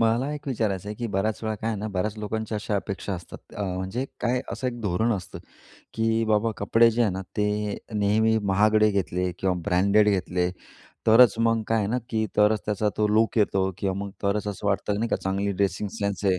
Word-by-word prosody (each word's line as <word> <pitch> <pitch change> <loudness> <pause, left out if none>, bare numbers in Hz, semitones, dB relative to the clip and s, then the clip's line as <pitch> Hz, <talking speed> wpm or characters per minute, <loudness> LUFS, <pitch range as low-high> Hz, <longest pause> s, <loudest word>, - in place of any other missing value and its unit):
मला 115 +5 +2
एक 145 - -9
विचारायचं 105 -6 -1
आहे 105 - -4
की 120 - -3
बऱ्याच 105 +2 0
वेळा 110 0 -1
काय 110 +2 -4
आहे 110 - -3
ना, 110 +2 -3
बऱ्याच 100 +2 -2
लोकांच्या 110 +1 -3
अशा 105 0 -3
अपेक्षा 100 0 -4
असतात 85 -1 -11
अ, 105 - -4
म्हणजे 95 +7 -3 0.2
काय 125 +1 +1
असं 130 - -3
एक 120 -1 -3
धोरण 110 +3 +1
असतं. 95 -4 -5 0.6
की 115 0 +1
बाबा 110 +1 +2
कपडे 115 +3 +4
जे 115 +2 +1
आहे 110 -4 +2
ना, 95 +1 -4 0.2
ते 105 0 0 0.2
नेहमी 110 +2 +3
महागडे 105 +2 +4
घेतले 90 -2 -1
किंवा 95 -1 +1
ब्रँडेड 100 +4 +4
घेतले, 90 -2 0 0.6
तरच 115 0 +7
मग 115 -1 +2
काय 115 - +2
आहे 105 - 0
ना, 120 +5 0
की 110 -2 0
तरच 105 0 +4
त्याचा 105 0 0
तो 105 - +2
लूक 110 +2 +2
येतो 95 -2 +2
किंवा 95 -1 -1
मग 100 - -6
तरच 100 +1 0
असं 105 0 -5
वाटतं 100 +1 0
नाही 115 +2 -1
का, - - +1
चांगली 100 +1 -1
ड्रेसिंग 100 +1 -1
सेन्स 100 -2 -2
आहे. 95 -2 +3
105 Hz, 210 wpm, -25 LUFS, 100-110 Hz, 0.6 s, तरच